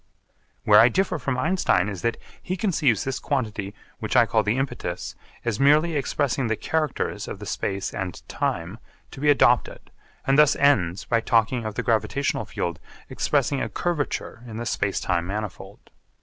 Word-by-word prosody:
Where 105 -1 +7
I 115 - +7
differ 190 -1 0
from 130 -1 -2
Einstein 175 - +2
is 95 -4 -5
that 115 +2 0 0.2
he 185 - -3
conceives 155 - +1
this 135 -1 -3
quantity 110 -7 -3 0.2
which - - -3
I - - +7
call - - +2
the 105 +4 0
impetus 125 -10 -3 0.3
as 115 -3 -1
merely 155 +4 +4
expressing 140 -2 0
the 110 - 0
characters 155 +3 -2
of - - -6
the - - -9
space 100 0 -3
and 95 -3 -5
time 85 +7 -3 0.3
to - - -10
be 150 +1 +2
adopted 125 -4 +2 0.3
and 135 +2 +3
thus 150 -1 +6
ends 100 -11 +2
by 115 -1 +1
talking 115 0 +1
of 110 -1 -4
the - - -2
gravitational 115 +5 0
field 85 -1 -4 0.3
expressing 140 -1 0
a - - -2
curvature 155 -8 -3
in 110 -1 -7
the 120 - -4
space 100 -4 -1
time 85 -1 -1
manifold. 100 -1 -6
120 Hz, 170 wpm, -24 LUFS, 105-145 Hz, 0.3 s, Where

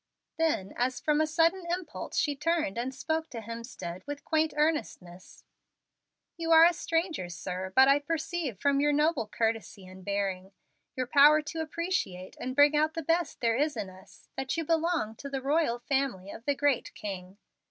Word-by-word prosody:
Then, 300 -13 0
as 250 +1 0
from 300 0 +2
a 310 - +2
sudden 330 +4 +2
impulse, 350 -3 -4
she 290 -2 +1
turned 310 - 0
and 240 +3 -2
spoke 315 +4 -2
to 235 - -6
Hemstead 230 -6 -7
with 290 0 -6
quaint 315 0 +1
earnestness: 240 - -2 0.9
"You 330 -1 -2
are 325 0 +9
a 350 - +5
stranger, 325 - -2
sir, 185 +1 -5
but 265 0 +7
I 275 +1 +5
perceive 315 - -3
from 280 +4 +2
your 295 +1 +3
noble 300 -6 +1
courtesy 220 -4 -2
and 185 0 -12
bearing 195 -1 -2 0.4
your 255 - -1
power 295 +4 +6
to 320 +2 -4
appreciate 315 - -3
and 255 +1 -4
bring 290 +1 +6
out 310 +2 +2
the 330 - -3
best 335 +3 0
there 230 -1 +2
is 290 0 0
in 200 -3 -4
us 185 +1 -18
that 270 +4 -3
you 330 - -1
belong 325 -9 0
to 280 - -7
the 275 -1 -2
royal 280 -2 +1
family 245 -7 -2
of 230 - -11
the 285 - +1
Great 280 -3 0
King. 190 -2 -7
280 Hz, 180 wpm, -29 LUFS, 215-320 Hz, 0.9 s, are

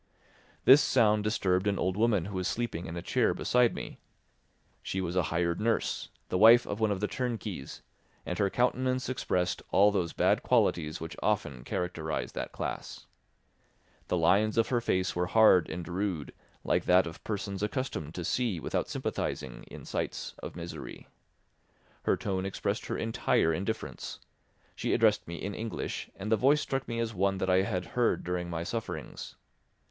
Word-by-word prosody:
This 135 +3 +9
sound 105 -4 +3
disturbed 95 -3 +1
an 100 -1 +1
old 95 0 0
woman 105 -4 +2
who 100 -1 -5
was 90 - -1
sleeping 115 -8 -3
in 85 +1 -6
a 85 - -5
chair - - +2
beside 125 -1 +2
me. - - -7 0.8
She 95 - -3
was 90 -1 -2
a 90 - +4
hired 85 +2 0
nurse, 115 +1 0 0.2
the 90 - 0
wife 115 +3 +8
of 100 - -4
one 110 -1 +2
of 100 -1 -1
the 105 - +1
turnkeys, 115 - -4 0.4
and 90 - -3
her 100 -1 +3
countenance 130 +3 0
expressed 90 -8 -1
all 105 +1 +5
those 90 -5 0
bad - - +2
qualities 75 0 +1
which 80 0 -6
often 65 -4 -1
characterise 80 -1 -3
that - - -5
class. - - -5 1.0
The 90 - +1
lines 100 +6 +3
of 115 - +3
her 120 -2 +1
face 95 -3 0
were 90 0 0
hard 105 -6 +5
and 85 +1 -5
rude, 90 -4 -3 0.3
like - - +1
that 90 +1 +5
of 80 -1 -8
persons 100 -2 -3
accustomed 105 - -3
to 90 - -4
see 115 -6 0
without - - -2
sympathising - - -3
in - - -10
sights - - -3
of - - -7
misery. 85 0 -8 1.0
Her - - +3
tone 95 -2 -2
expressed 100 +2 -2
her - - -2
entire 110 -7 +1
indifference; 100 +7 -4 0.6
she - - -1
addressed - - +3
me 85 - -5
in 100 +4 -4
English, 110 +1 -4
and 105 +3 -5
the 110 - +5
voice 140 +7 +4
struck 135 -1 -2
me 115 - -3
as 115 -1 -1
one 95 0 +1
that 95 0 0
I 95 +1 +5
had 95 -3 -2
heard 120 -2 +2
during 90 -1 -2
my 85 -1 -3
sufferings. 115 +5 -5
95 Hz, 175 wpm, -30 LUFS, 90-110 Hz, 1.0 s, This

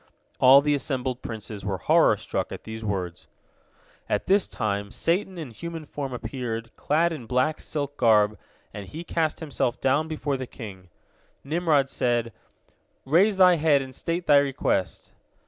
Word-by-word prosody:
All 135 +2 +8
the 145 0 +1
assembled 130 -2 -2
princes 110 -2 -7
were 95 -1 -2
horror 85 - +4
struck - - -3
at - - -7
these 110 0 -7
words. 90 -5 -4 0.8
At - - 0
this 195 0 +3
time 100 -1 -2
Satan 180 - -1
in 155 -7 -6
human 165 +6 -7
form 140 -2 -5
appeared, 115 -1 -5
clad 165 +3 +1
in 130 -8 -8
black 130 +6 0
silk 145 -2 -4
garb, 110 -2 +3 0.3
and 100 -2 -7
he 160 - -7
cast 160 -1 -1
himself 135 -5 -2
down 140 +4 +1
before 150 -3 -2
the 130 -1 -6
king. 95 -7 -10 0.5
Nimrod 150 -2 +2
said, 120 -4 0 0.7
"Raise 190 +9 +3
thy 180 -2 +6
head 150 -3 +3
and 130 0 -10
state 170 +6 -3
thy 145 -1 +6
request." 135 - 0
135 Hz, 155 wpm, -25 LUFS, 115-155 Hz, 0.8 s, All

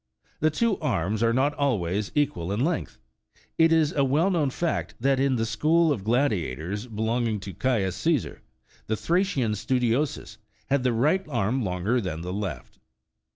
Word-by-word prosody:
The 155 - +3
two 215 +6 0
arms 105 - -1
are 115 0 +3
not 135 +5 +2
always 105 -8 -1
equal 100 - 0
in 100 - -1
length: 170 -1 -2 0.6
it 165 0 +5
is 160 -2 +3
a 140 - +2
well 150 +8 +2
known 155 -6 +1
fact, 170 +5 -2
that, 135 +2 +2
in 135 -1 +2
the 115 -2 0
school 160 +7 +2
of 115 -9 -2
gladiators 105 - -1
belong 115 +2 -1
ing 110 -2 -1
to 95 -1 -7
Caius 100 -2 0
Caesar,35 160 -6 0 0.5
the 110 - -1
Thracian 170 - +1
Studiosus 120 +1 -1 0.3
had 140 -1 +3
the 125 0 +1
right 150 +12 +2
arm 120 0 0
longer 100 +6 0
than 85 -5 -4
the 90 +1 -5
left. 95 -10 -5
120 Hz, 165 wpm, -26 LUFS, 105-145 Hz, 0.6 s, it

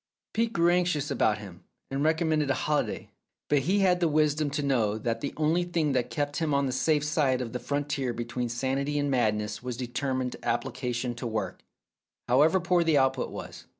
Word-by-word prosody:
Phcebe 230 0 +1
grew 170 0 +4
anxious 175 -5 +1
about 110 -6 +2
him, 95 -4 -11 0.3
and 135 +1 -1
recommended 155 -2 +2
a 140 - +2
holi 150 -1 +1
day, - - -7 0.4
but 145 - +4
he 185 +9 +1
had 180 -2 +3
the 175 - +3
wisdom 150 -1 +2
to 145 +1 -2
know 115 -7 +1
that 115 +1 -2
the 140 - -2
only 160 +3 +2
thing 170 -4 0
that 125 -2 0
kept 145 -1 -2
him 155 -3 0
on 140 0 +2
the 130 - -1
safe 150 +3 +1
side 150 -4 +1
of 120 -3 -4
the 125 - -2
frontier 145 -1 -2
between 120 +1 -3
sanity 135 +4 -1
and 145 -1 0
madness 105 -4 0
was 125 -1 -5
determined 130 0 -2
appli 120 +2 -1
cation 125 -1 -2
to 120 +1 -5
work, 110 -1 -3 0.7
however 150 +9 +4
poor 175 0 +2
the 160 -3 +3
output 135 -1 +2
was. - - -9
140 Hz, 200 wpm, -28 LUFS, 125-155 Hz, 0.7 s, grew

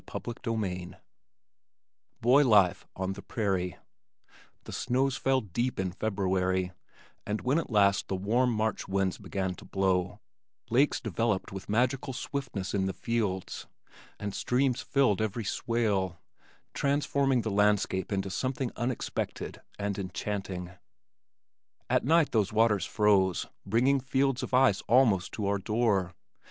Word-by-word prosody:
CHAPTER 120 - -4
XIII 95 -6 -3 1.3
Boy 130 +5 +6
Life 100 -8 +4
on 95 +1 -2
the 100 - -9
Prairie 95 -6 -2 0.9
The - - -9
snows 130 +2 0
fell 135 -1 +1
deep 120 +4 -2
in 95 -1 -1
February 95 -2 0 0.5
and 105 +1 -3
when 135 +6 +2
at - - -5
last 100 -3 +3
the 95 - -1
warm 115 +7 +1
March 110 -1 -1
winds 95 -1 0
began 95 -2 -3
to - - -13
blow, 95 -2 0 0.5
lakes 135 +5 +3
developed 115 -5 -1
with 95 +1 -8
magical 125 +4 +1
swiftness 125 -8 -4
in 95 -2 +1
the 95 - -2
fields, 105 -6 -2 0.5
and 100 -1 -4
streams 125 0 +1
filled 130 -8 +2
every 110 +1 -2
swale, 100 -6 0 0.6
transforming 140 -2 +1
the 110 - -3
landscape 100 -2 +1
into 95 -1 -1
something 130 +4 -2
unexpected 120 +1 -3 0.2
and 100 -1 -2
enchanting. 95 -1 -4 1.2
At - - +3
night 160 +2 +3
these 105 -4 +1
waters 110 -2 +2
froze, 100 -5 +2 0.2
bringing 125 +7 +3
fields 130 0 0
of - - -5
ice 130 -6 +4
almost 110 -7 +4
to 105 - -3
our 100 0 +1
door. 100 -4 0
105 Hz, 130 wpm, -29 LUFS, 95-125 Hz, 1.3 s, Boy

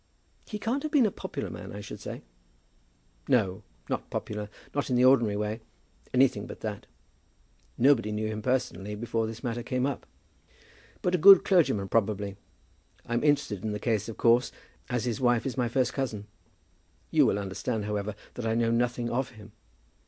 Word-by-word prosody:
"He 210 - -4
can't 235 +6 -1
have 310 0 -4
been 280 -6 +5
a 210 - +1
popular - - -5
man, - - -8
I 100 - -7
should 105 - -8
say?" - - -7 1.0
"No; 95 -6 +2 0.3
not - - -3
popular, 105 0 -4 0.2
not 145 -1 -1
in 125 - +1
the 125 +1 +5
ordinary 120 -6 +4
way; 105 +2 -2 0.5
anything 125 -6 +3
but - - -9
that. 105 -2 -5 0.9
Nobody 125 -5 +4
knew 105 +1 -2
him 110 0 -3
personally 115 -4 -1
before 115 0 -1
this 115 +1 -8
matter 120 0 -2
came 125 +1 -1
up." 140 - -3 1.0
"But 180 - +1
a 180 - +3
good 195 +3 +9
clergyman, 165 - +3
probably? 100 -2 0 0.7
I'm 120 +2 -1
interested 145 -10 +1
in 110 -1 -2
the 105 - -3
case, 110 -1 0
of 110 - -7
course, 120 +2 +4 0.4
as 125 -1 -1
his 120 +2 -2
wife 120 -2 +3
is 135 - -2
my 125 -3 0
first 130 +1 +1
cousin. 115 -7 -3 0.9
You - - +5
will - - +2
understand, 100 +3 -3
however, 105 0 -2 0.2
that 120 -2 -4
I 110 - +1
know 115 0 +2
nothing 120 0 0
of 130 +2 -1
him. 110 -2 -14
115 Hz, 175 wpm, -28 LUFS, 105-130 Hz, 1.0 s, good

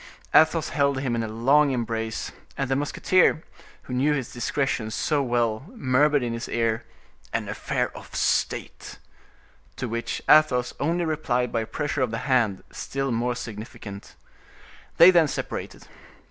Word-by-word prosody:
Athos 160 +1 +4
held 140 -2 +1
him 130 -3 -1
in 115 - 0
a 110 - -3
long 135 +7 +3
embrace, 115 -3 -3 0.3
and 135 -1 -2
the - - +3
musketeer, 155 +4 +2 0.4
who 125 - -7
knew 140 +4 +2
his 130 -4 -4
discretion 120 -2 -1
so 145 +6 0
well, 120 -2 0
murmured 145 - +2
in 120 -1 -2
his 115 +2 -5
ear—"An 115 -1 -4
affair - - -2
of - - -11
state," - - -1 0.8
to 125 - -4
which 115 +1 -3
Athos 135 -5 +4
only 170 +4 0
replied 125 -6 -1
by 115 - 0
a 110 - -5
pressure 145 -2 -2
of 130 - +1
the 115 - -3
hand, 120 -8 +1
still 135 -1 -3
more 120 +1 0
significant. 110 -3 -8 0.8
They 175 +2 +9
then 170 -3 +4
separated. - - -5
125 Hz, 145 wpm, -25 LUFS, 115-145 Hz, 0.8 s, They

